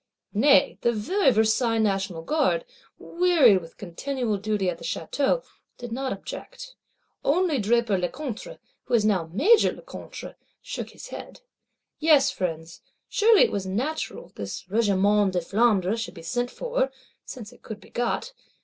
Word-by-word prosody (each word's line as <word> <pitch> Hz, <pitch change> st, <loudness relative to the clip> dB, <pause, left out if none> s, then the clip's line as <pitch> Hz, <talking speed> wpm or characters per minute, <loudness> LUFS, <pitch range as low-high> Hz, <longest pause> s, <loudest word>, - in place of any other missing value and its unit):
Nay 275 Hz, +7 st, +4 dB
the 235 Hz, -, +3 dB
very 270 Hz, -, +2 dB
Versailles 225 Hz, 0 st, +2 dB
National 195 Hz, -5 st, 0 dB
Guard, 320 Hz, -, +1 dB, 0.3 s
wearied 330 Hz, -, +4 dB
with 165 Hz, 0 st, -14 dB
continual 220 Hz, +4 st, -3 dB
duty 210 Hz, -1 st, -1 dB
at 170 Hz, -2 st, -2 dB
the -, -, -11 dB
Château, 285 Hz, -, -1 dB, 0.3 s
did 240 Hz, -1 st, -8 dB
not 265 Hz, +2 st, -2 dB
object; -, -, -8 dB, 0.5 s
only 320 Hz, -1 st, +2 dB
Draper 220 Hz, -2 st, +2 dB
Lecointre, 260 Hz, -, -5 dB, 0.3 s
who 245 Hz, -, +1 dB
is 215 Hz, -2 st, +3 dB
now 185 Hz, -6 st, +1 dB
Major 385 Hz, -, +5 dB
Lecointre, -, -, -9 dB, 0.3 s
shook -, -, -6 dB
his -, -, -11 dB
head.—Yes, 315 Hz, -, -1 dB
Friends, 165 Hz, -2 st, -4 dB, 0.3 s
surely 435 Hz, -1 st, +5 dB
it -, -, +2 dB
was 195 Hz, -2 st, -3 dB
natural 295 Hz, -, -3 dB
this -, -, -6 dB
Regiment 205 Hz, -2 st, +3 dB
de 180 Hz, -, +2 dB
Flandre 200 Hz, +1 st, +2 dB
should 225 Hz, -3 st, -5 dB
be 165 Hz, -, -10 dB
sent 245 Hz, +7 st, -1 dB
for, 485 Hz, -, -1 dB, 0.3 s
since 225 Hz, -5 st, -9 dB
it -, -, -20 dB
could 220 Hz, -1 st, -8 dB
be 190 Hz, -, -18 dB
got. 245 Hz, -, -2 dB
230 Hz, 145 wpm, -25 LUFS, 195-290 Hz, 0.5 s, Major